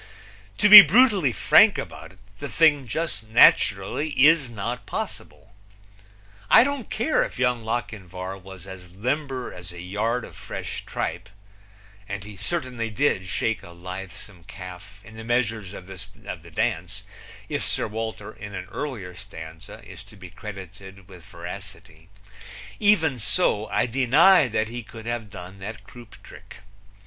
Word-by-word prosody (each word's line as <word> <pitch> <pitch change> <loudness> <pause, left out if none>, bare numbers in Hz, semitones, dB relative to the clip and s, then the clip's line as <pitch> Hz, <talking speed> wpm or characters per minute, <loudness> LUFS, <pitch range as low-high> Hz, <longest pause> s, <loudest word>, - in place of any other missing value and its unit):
To 210 - +4
be 210 0 +14
brutally 195 - +4
frank 105 - +5
about - - -8
it, - - -23 0.2
the 145 - -6
thing 150 -5 +3
just 155 -3 -3
naturally 110 +4 +4
is 150 -1 +5
not 120 +3 -5
possible. 95 - -7 1.0
I 225 - +8
don't 280 -4 -3
care 300 +8 +1
if - - -3
Young 125 -2 0
Lochinvar 95 -5 -5
was 95 -1 -12
as 95 -2 -11
limber 130 - -3
as 90 -1 -10
a 90 - -11
yard 110 +7 -2
of - - -14
fresh - - -7
tripe 90 +5 -4 0.8
and 100 -1 -5
he 105 0 -10
certainly 120 - -3
did 105 -5 0
shake 115 +4 -1
a - - -13
lithesome 90 +1 -9
calf 95 +1 -11
in 110 +1 -13
the 110 - -8
measures 115 -4 -1
of 95 - -10
the 95 -1 -9
dance - - -2 0.4
if - - -3
Sir - - -1
Walter, 110 0 -5
in 100 -1 -9
an 90 - -5
earlier 110 -12 -5
stanza, 80 -2 -11
is - - -11
to 105 +2 -17
be 95 -3 -12
credited 95 -1 -11
with 90 -3 -14
veracity. 90 -2 -10 0.7
Even 165 - +3
so, 105 0 +1
I 105 - +1
deny 135 +7 +5
that 110 -1 -1
he 120 +2 -6
could 110 0 -12
have 120 -2 -4
done 95 +1 -10
that 105 +2 -8
croupe 120 +2 -14
trick. - - -14
105 Hz, 150 wpm, -24 LUFS, 95-125 Hz, 1.0 s, be